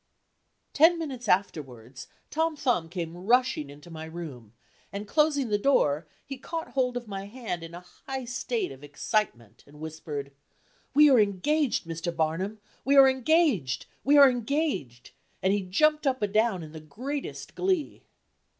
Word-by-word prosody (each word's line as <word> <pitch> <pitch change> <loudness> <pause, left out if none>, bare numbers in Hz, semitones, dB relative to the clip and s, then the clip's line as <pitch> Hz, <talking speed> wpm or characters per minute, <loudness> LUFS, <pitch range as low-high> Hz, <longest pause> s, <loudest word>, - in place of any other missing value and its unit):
Ten 330 +3 +6
minutes 265 -8 -5
afterwards 130 - -2 0.2
Tom 320 +1 0
Thumb 240 - 0
came 170 -2 -5
rushing 200 - +1
into 145 +4 -13
my 160 -1 -7
room, 150 -10 -9 0.4
and 200 +1 -6
closing 295 -2 +2
the 205 -1 +1
door, 155 - +2 0.2
he 275 -2 -7
caught 325 +4 -5
hold 250 -2 0
of 240 -2 -7
my 195 -1 -6
hand 215 -6 -5
in 165 +1 -9
a 180 +1 -11 0.2
high 265 -1 -4
state 240 - -2
of 135 +1 -12
excitement 140 - -2
and 150 +1 -16
whispered: 155 -3 -6 0.6
"We 300 +1 +8
are 255 - +6
engaged, 220 - +1
Mr. 165 +1 -4
Barnum! 165 +6 -1 0.3
we 280 +2 +3
are 270 -1 +9
engaged! 260 - +2 0.2
we 290 +2 +5
are 280 -1 +10
engaged!" 245 - -2 0.3
and 190 +1 +3
he 205 - +1
jumped 300 +11 +2
up 260 -4 0
and 205 -1 -1
down 215 -5 +2
in 155 - -10
the 160 - -8
greatest 255 - -6
glee. 370 -5 -1
205 Hz, 160 wpm, -27 LUFS, -, 0.6 s, are